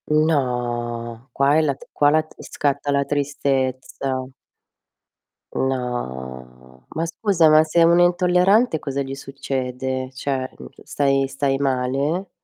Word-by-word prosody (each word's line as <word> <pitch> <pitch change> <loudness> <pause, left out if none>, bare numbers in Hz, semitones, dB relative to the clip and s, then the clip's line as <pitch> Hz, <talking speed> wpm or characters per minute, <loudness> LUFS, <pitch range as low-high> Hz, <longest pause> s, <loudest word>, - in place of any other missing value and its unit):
No, 120 -5 -1
qua 140 +4 +3
è - - +4
la 140 -4 0
qua 145 - +3
la 155 +1 +2
scatta 145 0 -2
la 140 0 +1
tristezza. 135 -2 -2 1.3
No, 65 - -5
ma 165 - 0
scusa, 170 -1 +2
ma 155 0 +7
se 165 +2 +3
uno 170 +1 +5
è - - +7
intollerante 180 +3 +3
cosa 140 -1 -3
gli 135 0 -5
succede? 130 -1 -4
Cioè, 130 -1 -3
mhmm, 65 -1 -10 0.2
stai 135 -1 +1
stai 135 0 -1
male? 140 +7 -1
135 Hz, 120 wpm, -22 LUFS, 125-155 Hz, 1.3 s, ma